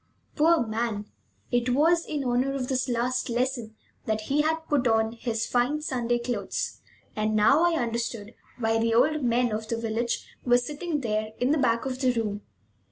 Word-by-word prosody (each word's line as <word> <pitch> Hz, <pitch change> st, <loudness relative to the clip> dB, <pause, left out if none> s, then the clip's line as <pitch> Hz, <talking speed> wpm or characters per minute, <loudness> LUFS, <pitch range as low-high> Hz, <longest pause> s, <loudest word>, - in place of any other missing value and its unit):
Poor 320 Hz, -2 st, +4 dB
man! 220 Hz, -1 st, -2 dB, 0.5 s
It 245 Hz, 0 st, +1 dB
was 335 Hz, +4 st, +3 dB
in 295 Hz, -2 st, -2 dB
honor 255 Hz, +2 st, +1 dB
of 255 Hz, -2 st, -3 dB
this 260 Hz, 0 st, 0 dB
last 250 Hz, +2 st, 0 dB
lesson 240 Hz, -2 st, -1 dB, 0.3 s
that 220 Hz, 0 st, 0 dB
he 280 Hz, +7 st, +1 dB
had 320 Hz, +1 st, -1 dB
put 275 Hz, -4 st, +2 dB
on 225 Hz, -1 st, +2 dB
his 230 Hz, -1 st, -2 dB
fine 250 Hz, +5 st, +1 dB
Sunday 245 Hz, -5 st, -1 dB
clothes, 240 Hz, 0 st, -3 dB, 0.3 s
and 215 Hz, 0 st, 0 dB
now 275 Hz, +10 st, +5 dB
I 345 Hz, -1 st, +3 dB
understood 235 Hz, -3 st, -3 dB, 0.2 s
why 225 Hz, -2 st, +1 dB
the 230 Hz, 0 st, +1 dB
old 300 Hz, +6 st, +3 dB
men 240 Hz, 0 st, +2 dB
of 215 Hz, +1 st, -3 dB
the 230 Hz, -, -2 dB
village 230 Hz, +1 st, -2 dB, 0.2 s
were 245 Hz, -1 st, +5 dB
sitting 295 Hz, +4 st, -3 dB
there 215 Hz, -2 st, -2 dB
in 250 Hz, +3 st, +2 dB
the 305 Hz, -, +2 dB
back 235 Hz, -2 st, +1 dB
of 260 Hz, -1 st, -3 dB
the 255 Hz, -2 st, +3 dB
room. 210 Hz, -3 st, -2 dB
245 Hz, 180 wpm, -27 LUFS, 225-270 Hz, 0.5 s, now